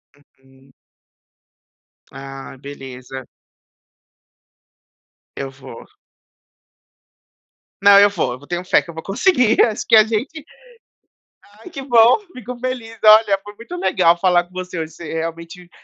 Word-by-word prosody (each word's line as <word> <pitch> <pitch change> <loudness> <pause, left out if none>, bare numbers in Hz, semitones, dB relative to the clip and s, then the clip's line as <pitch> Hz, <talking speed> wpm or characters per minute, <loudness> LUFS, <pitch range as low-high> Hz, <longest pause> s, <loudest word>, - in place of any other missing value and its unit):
Uhum. 135 -2 -26 1.4
Ah, 135 0 -10
Beleza. 130 -2 -10 2.1
Eu 135 - -5
vou. 135 -3 -13 2.0
Não 200 0 +7
eu 205 0 +6
vou, 195 -10 -2
eu - - -8
vou 145 - -17
tenho 175 0 -4
fé 185 - +2
que - - -17
eu - - -8
vou 160 0 -8
conseguir 245 - +2
acho 225 0 -4
que 230 - +5
a 215 - +8
gente 240 +8 -4 1.2
ai 365 - -12
que 290 -5 -8
bom, 240 - +5
fico 250 0 -8
feliz, 240 -3 -5
olha, 215 -2 +6
foi 205 +1 -12
muito 230 +11 -10
legal 175 - +2
falar 175 -1 +2
com 175 - -27
você 185 -1 -6
hoje, 160 0 -5
você 170 -3 -9
realmente 165 +2 -6
185 Hz, 135 wpm, -19 LUFS, 145-225 Hz, 2.1 s, a